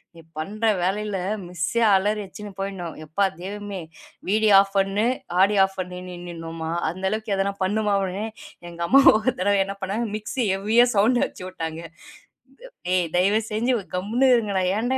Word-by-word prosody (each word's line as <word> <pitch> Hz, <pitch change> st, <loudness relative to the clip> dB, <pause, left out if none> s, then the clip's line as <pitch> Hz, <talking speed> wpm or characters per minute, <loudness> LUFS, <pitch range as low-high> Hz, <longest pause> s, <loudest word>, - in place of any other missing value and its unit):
நீ 165 Hz, -, -12 dB, 0.2 s
பண்ற 210 Hz, +8 st, -3 dB, 0.2 s
வேலையில 200 Hz, +2 st, -1 dB, 0.3 s
மிஸ்ஸெ 175 Hz, +6 st, -2 dB
அலறி 210 Hz, +2 st, +2 dB
வச்சு 195 Hz, +2 st, -11 dB, 0.2 s
போயிடனும். 190 Hz, -4 st, -4 dB
எப்பா 165 Hz, +6 st, -1 dB, 0.2 s
தேவுமே 200 Hz, +1 st, -6 dB, 0.5 s
வீடியோ 215 Hz, +1 st, +3 dB
ஆப் 195 Hz, -, +2 dB
பன்னு 195 Hz, +2 st, +1 dB, 0.3 s
ஆடியோ 200 Hz, +1 st, +4 dB
ஆப் 195 Hz, 0 st, -1 dB
பண்ணி 180 Hz, 0 st, -5 dB
நின்னுன்னுமா 165 Hz, -2 st, -7 dB, 0.2 s
அந்தளவுக்கு 195 Hz, +5 st, -2 dB
அதெல்லாம் 195 Hz, +1 st, -2 dB
பண்ணுமா? 205 Hz, +1 st, 0 dB, 0.8 s
எங்க 170 Hz, 0 st, -12 dB
அம்மா 275 Hz, -, +6 dB, 0.2 s
ஒருதடவை 205 Hz, -3 st, +1 dB
என்ன 195 Hz, +1 st, -5 dB
பண்ணா 190 Hz, +2 st, -3 dB, 0.2 s
மிக்சிய 215 Hz, +3 st, -2 dB
ஹெவியா 220 Hz, +5 st, +4 dB
சௌண்டு 235 Hz, +5 st, +3 dB
வச்சு -, -, -10 dB
விட்டாங்க. 165 Hz, -3 st, -5 dB, 1.3 s
தயவு 195 Hz, +4 st, +3 dB
செஞ்சு 235 Hz, +4 st, +1 dB, 0.2 s
கம்முனு 225 Hz, +8 st, +1 dB
இருங்க. 215 Hz, -4 st, -1 dB, 0.2 s
ஏன்டா 245 Hz, +5 st, 0 dB
200 Hz, 135 wpm, -23 LUFS, 185-215 Hz, 1.3 s, அம்மா